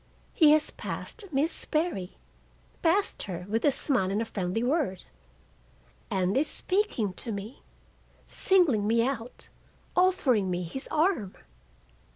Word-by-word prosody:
He 310 Hz, -3 st, +6 dB
has 310 Hz, 0 st, +2 dB
passed 440 Hz, -, -4 dB
Miss 295 Hz, +4 st, +2 dB
Sperry—passed 330 Hz, -, -2 dB
her 180 Hz, -1 st, -5 dB
with 225 Hz, +2 st, -1 dB
a -, -, +5 dB
smile 255 Hz, -8 st, 0 dB
and 200 Hz, +2 st, 0 dB
a 230 Hz, -, -1 dB
friendly 195 Hz, +1 st, -2 dB
word—and 180 Hz, -, -4 dB
is 290 Hz, +3 st, +2 dB
speaking 365 Hz, -, -1 dB
to 230 Hz, +5 st, -5 dB
me, 210 Hz, +5 st, -6 dB, 0.6 s
singling 305 Hz, -, +2 dB
me 230 Hz, +1 st, +3 dB
out, 250 Hz, -3 st, -4 dB, 0.5 s
offering 285 Hz, -, +3 dB
me 180 Hz, 0 st, -1 dB
his 220 Hz, +11 st, -5 dB
arm! 305 Hz, -, +1 dB
230 Hz, 120 wpm, -28 LUFS, 190-310 Hz, 0.6 s, He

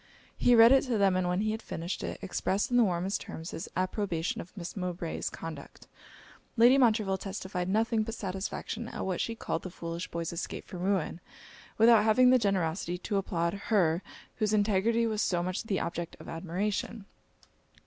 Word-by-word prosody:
He 245 Hz, -, +4 dB
read 230 Hz, +1 st, +8 dB
it 270 Hz, -1 st, +6 dB
to 245 Hz, -4 st, 0 dB
them; 195 Hz, -2 st, +3 dB
and 185 Hz, -1 st, +1 dB
when 180 Hz, +2 st, 0 dB
he 215 Hz, 0 st, 0 dB
had 220 Hz, +1 st, -4 dB
finished 170 Hz, -2 st, -5 dB
it, -, -, -4 dB
expressed 195 Hz, +3 st, -1 dB
in 245 Hz, -, +3 dB
the 240 Hz, -, +6 dB
warmest 185 Hz, 0 st, 0 dB
terms 165 Hz, +1 st, -7 dB
his 165 Hz, -, -6 dB
approbation 185 Hz, -3 st, -1 dB
of 185 Hz, +5 st, -14 dB
Miss 170 Hz, -2 st, -6 dB
Mowbray's 180 Hz, -3 st, -3 dB
conduct. 155 Hz, -4 st, -9 dB, 0.7 s
Lady 240 Hz, +3 st, +7 dB
Montreville 215 Hz, -6 st, +3 dB
testified 190 Hz, -2 st, -4 dB
nothing 225 Hz, +2 st, +2 dB
but 225 Hz, +1 st, -4 dB
satisfaction 200 Hz, +4 st, -4 dB
at -, -, -5 dB
what 185 Hz, -2 st, -1 dB
she 230 Hz, -, -2 dB
called 165 Hz, -, -3 dB
'the 185 Hz, -, -6 dB
foolish 170 Hz, 0 st, -5 dB
boy's 170 Hz, 0 st, -4 dB
escape 170 Hz, -, -5 dB
from 180 Hz, -, -8 dB
ruin,' 185 Hz, -3 st, -1 dB, 0.6 s
without 225 Hz, -1 st, +6 dB
having 250 Hz, +4 st, +5 dB
the 255 Hz, -, +6 dB
generosity 180 Hz, -4 st, 0 dB
to 200 Hz, +3 st, -2 dB
applaud 170 Hz, -3 st, -1 dB, 0.2 s
her, 175 Hz, -6 st, +3 dB, 0.4 s
whose 215 Hz, -1 st, +1 dB
integrity 215 Hz, +2 st, +2 dB
was 215 Hz, -2 st, 0 dB
so 175 Hz, -4 st, +1 dB
much 185 Hz, +1 st, -2 dB
the 200 Hz, -3 st, 0 dB
object 170 Hz, 0 st, -4 dB
of -, -, -11 dB
admiration. 195 Hz, +5 st, -3 dB
195 Hz, 180 wpm, -30 LUFS, 175-220 Hz, 0.7 s, read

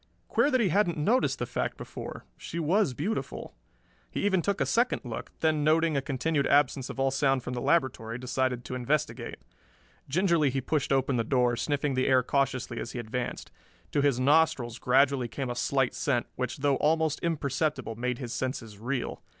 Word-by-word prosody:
Queer 285 Hz, -, +3 dB
that 260 Hz, -3 st, +2 dB
he 205 Hz, -, +2 dB
hadn't 175 Hz, -1 st, +2 dB
noticed 225 Hz, +13 st, +2 dB
the -, -, -2 dB
fact -, -, -3 dB
before -, -, -8 dB
she -, -, -7 dB
was 170 Hz, -2 st, +2 dB
beautiful. 200 Hz, -, -3 dB, 0.6 s
He -, -, -2 dB
even 190 Hz, -3 st, +3 dB
took 200 Hz, +3 st, -1 dB
a -, -, +2 dB
second 240 Hz, +2 st, +1 dB
look, 120 Hz, -, -6 dB
then 155 Hz, -2 st, +2 dB
noting 160 Hz, +1 st, +3 dB
a 140 Hz, -, +2 dB
continued 140 Hz, +1 st, 0 dB
absence 140 Hz, -2 st, +2 dB
of -, -, -7 dB
all 135 Hz, 0 st, +2 dB
sound 135 Hz, -1 st, +1 dB
from 125 Hz, -, -4 dB
the 120 Hz, -, -3 dB
laboratory 120 Hz, -8 st, +1 dB
decided 125 Hz, -1 st, -1 dB
to -, -, -6 dB
investigate. 125 Hz, +4 st, -2 dB, 0.7 s
Gingerly 170 Hz, -2 st, +3 dB
he 135 Hz, +1 st, -1 dB
pushed 145 Hz, +2 st, -1 dB
open 135 Hz, -1 st, +2 dB
the 115 Hz, -, +1 dB
door, 125 Hz, 0 st, +2 dB
sniffing 145 Hz, +2 st, -1 dB
the 130 Hz, 0 st, +1 dB
air 130 Hz, -1 st, +4 dB
cautiously 130 Hz, -2 st, -1 dB
as -, -, -5 dB
he -, -, -5 dB
advanced. 120 Hz, +1 st, -4 dB, 0.4 s
To 145 Hz, -, +2 dB
his 140 Hz, -3 st, +2 dB
nostrils 140 Hz, -4 st, +2 dB
gradually 130 Hz, 0 st, +3 dB
came 130 Hz, +1 st, -4 dB
a -, -, -4 dB
slight 135 Hz, +1 st, +1 dB
scent, 125 Hz, -5 st, 0 dB
which 125 Hz, 0 st, -3 dB
though 140 Hz, -1 st, +2 dB
almost 160 Hz, 0 st, +1 dB
imperceptible 150 Hz, -5 st, -1 dB
made 125 Hz, +2 st, -2 dB
his 120 Hz, -2 st, -5 dB
senses 115 Hz, -6 st, -4 dB
reel. 125 Hz, +3 st, -3 dB
135 Hz, 185 wpm, -28 LUFS, 125-155 Hz, 0.7 s, air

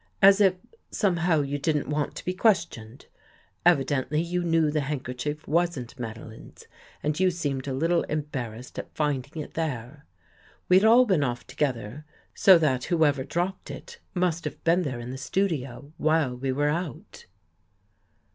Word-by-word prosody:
As 195 Hz, +1 st, +7 dB
if, 190 Hz, -2 st, +5 dB, 0.3 s
somehow, 175 Hz, -5 st, +1 dB
you 140 Hz, +1 st, -3 dB
didn't 150 Hz, 0 st, 0 dB
want 150 Hz, 0 st, -2 dB
to -, -, -8 dB
be 180 Hz, -, -1 dB
questioned. 170 Hz, -, 0 dB, 0.6 s
Evi 165 Hz, -6 st, +5 dB
dently 145 Hz, +4 st, -1 dB
you 180 Hz, +1 st, -1 dB
knew 165 Hz, -3 st, +2 dB
the 150 Hz, 0 st, 0 dB
handkerchief 140 Hz, +1 st, -4 dB
wasn't 150 Hz, -6 st, -1 dB
Madeline's 110 Hz, -1 st, -9 dB, 0.4 s
and 150 Hz, +2 st, -1 dB
you 185 Hz, 0 st, +4 dB
seemed 145 Hz, -6 st, -3 dB
a 135 Hz, -, -2 dB
little 165 Hz, +5 st, +2 dB
embarrassed 130 Hz, -6 st, -5 dB
at -, -, -8 dB
finding 150 Hz, 0 st, -2 dB
it -, -, -13 dB
there. 145 Hz, -2 st, -4 dB, 0.6 s
We 185 Hz, -, +6 dB
had 205 Hz, -, +1 dB
all 240 Hz, +3 st, +7 dB
been 185 Hz, -10 st, +2 dB
off 120 Hz, -2 st, -3 dB
together, 125 Hz, -1 st, -3 dB, 0.3 s
so 190 Hz, -2 st, +7 dB
that 130 Hz, -6 st, +1 dB
who 165 Hz, -2 st, +3 dB
ever 140 Hz, -3 st, +1 dB
dropped 175 Hz, +7 st, -3 dB
it 475 Hz, -1 st, -9 dB, 0.2 s
must 175 Hz, -2 st, 0 dB
have -, -, -6 dB
been 170 Hz, +2 st, +3 dB
there 135 Hz, -7 st, -3 dB
in 120 Hz, +1 st, -6 dB
the 130 Hz, -, -6 dB
studio 145 Hz, -4 st, -2 dB
while 155 Hz, -5 st, +2 dB
we 130 Hz, +2 st, -2 dB
were 145 Hz, +3 st, +1 dB
out." 170 Hz, +3 st, -5 dB
150 Hz, 165 wpm, -26 LUFS, 135-175 Hz, 0.6 s, As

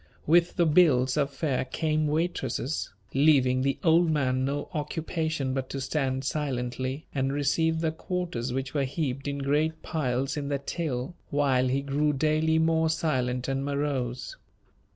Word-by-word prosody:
With 170 Hz, +2 st, +4 dB
the 175 Hz, -, +3 dB
bills 150 Hz, -6 st, +4 dB
of 145 Hz, -2 st, +1 dB
fare 135 Hz, -2 st, -1 dB
came 155 Hz, +3 st, 0 dB
waitresses, 155 Hz, -3 st, -1 dB, 0.2 s
leaving 135 Hz, -3 st, +4 dB
the 135 Hz, +1 st, 0 dB
old 165 Hz, 0 st, +4 dB
man 130 Hz, -4 st, +1 dB
no 140 Hz, +2 st, -2 dB
occupation 155 Hz, -2 st, -2 dB
but 130 Hz, -1 st, -3 dB
to 135 Hz, -, -4 dB
stand 130 Hz, -1 st, -1 dB
silently, 130 Hz, -1 st, -2 dB
and 135 Hz, -1 st, 0 dB
receive 160 Hz, +3 st, +1 dB
the 160 Hz, -1 st, +1 dB
quarters 160 Hz, -7 st, -3 dB
which 130 Hz, 0 st, -3 dB
were 145 Hz, -2 st, +1 dB
heaped 135 Hz, -1 st, -3 dB
in 140 Hz, 0 st, -2 dB
great 150 Hz, +3 st, 0 dB
piles 135 Hz, -3 st, -1 dB
in 145 Hz, -1 st, -3 dB
the 140 Hz, 0 st, 0 dB
till, 140 Hz, -1 st, -3 dB, 0.2 s
while 135 Hz, -3 st, +2 dB
he 135 Hz, +2 st, 0 dB
grew 145 Hz, +2 st, +1 dB
daily 155 Hz, +2 st, +2 dB
more 160 Hz, 0 st, +2 dB
silent 130 Hz, -6 st, 0 dB
and 135 Hz, 0 st, -1 dB
morose. 140 Hz, -3 st, -2 dB
140 Hz, 150 wpm, -27 LUFS, 130-160 Hz, 0.2 s, With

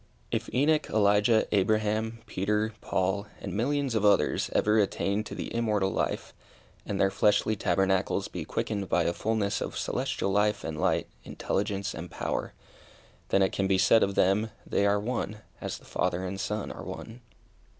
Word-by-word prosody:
If -, -, -2 dB
Enoch, 150 Hz, +4 st, +2 dB
Elijah, 105 Hz, +2 st, +3 dB
Abraham, 110 Hz, +3 st, +1 dB
Peter, 105 Hz, +1 st, -1 dB
Paul, 95 Hz, +2 st, -1 dB
and -, -, -6 dB
millions 135 Hz, +4 st, 0 dB
of 110 Hz, -2 st, +1 dB
others 105 Hz, -1 st, +3 dB
ever 105 Hz, +1 st, +3 dB
attain 100 Hz, 0 st, 0 dB
to -, -, -7 dB
the -, -, -5 dB
immortal 105 Hz, -4 st, +1 dB
life, -, -, -2 dB, 0.5 s
and 100 Hz, -, -2 dB
their 95 Hz, -, +3 dB
fleshly 105 Hz, +2 st, +2 dB
tabernacles 95 Hz, -1 st, +1 dB
be -, -, -5 dB
quickened 100 Hz, -3 st, -3 dB
by 85 Hz, -, +3 dB
a 85 Hz, -, 0 dB
fulness 110 Hz, 0 st, -1 dB
of -, -, -4 dB
celestial 100 Hz, -, -1 dB
life 105 Hz, +2 st, +2 dB
and 80 Hz, -1 st, -4 dB
light, -, -, +2 dB, 0.2 s
intelligence 100 Hz, +5 st, -2 dB
and 85 Hz, +2 st, -7 dB
power, -, -, -3 dB, 0.8 s
then 95 Hz, -, +4 dB
it 95 Hz, -, +2 dB
can 95 Hz, -, 0 dB
be 95 Hz, -1 st, +3 dB
said 100 Hz, +4 st, +5 dB
of 100 Hz, 0 st, +1 dB
them, 100 Hz, +4 st, +3 dB, 0.2 s
they 100 Hz, -, +1 dB
are 100 Hz, 0 st, +3 dB
one, 110 Hz, -1 st, -3 dB, 0.2 s
as -, -, -4 dB
the -, -, -18 dB
Father 90 Hz, +2 st, -1 dB
and 95 Hz, +1 st, -4 dB
Son 105 Hz, 0 st, -3 dB
are -, -, -8 dB
one. 115 Hz, +2 st, -8 dB
105 Hz, 170 wpm, -28 LUFS, 95-110 Hz, 0.8 s, said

